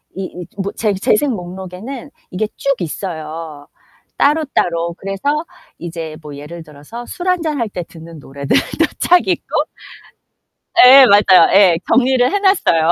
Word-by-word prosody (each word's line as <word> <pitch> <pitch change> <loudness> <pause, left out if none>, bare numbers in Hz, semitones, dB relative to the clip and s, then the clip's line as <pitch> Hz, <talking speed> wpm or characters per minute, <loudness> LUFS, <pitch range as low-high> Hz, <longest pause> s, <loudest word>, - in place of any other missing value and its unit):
이 195 - -5 0.2
이 - - -11 0.2
뭐 200 +1 -3
재 215 -2 0
재생 215 +8 +1
목록에는 190 +7 -8 0.2
이게 200 +4 -2
쭉 275 0 0
있어요, 160 -3 -6 0.5
따로따로. 180 - 0
그래서 280 - -3 0.3
이제 165 -2 -7
뭐 150 -2 -10
예를 165 +4 -9
들어서 150 +11 -11
술 360 0 -7
1 365 -2 +1
잔 310 -3 -2
할 230 -2 -2
때 180 -3 -5
듣는 165 -1 -13
노래들도 140 0 -1 0.2
쫙 355 0 +4
있고 365 - -1 1.2
예, 265 0 +9
맞아요 200 -5 +5
예. 190 -4 +5
정리를 255 -1 +3
해 405 - 0
놨어요. 170 - +2
190 Hz, 260 characters per minute, -16 LUFS, 165-265 Hz, 1.2 s, 예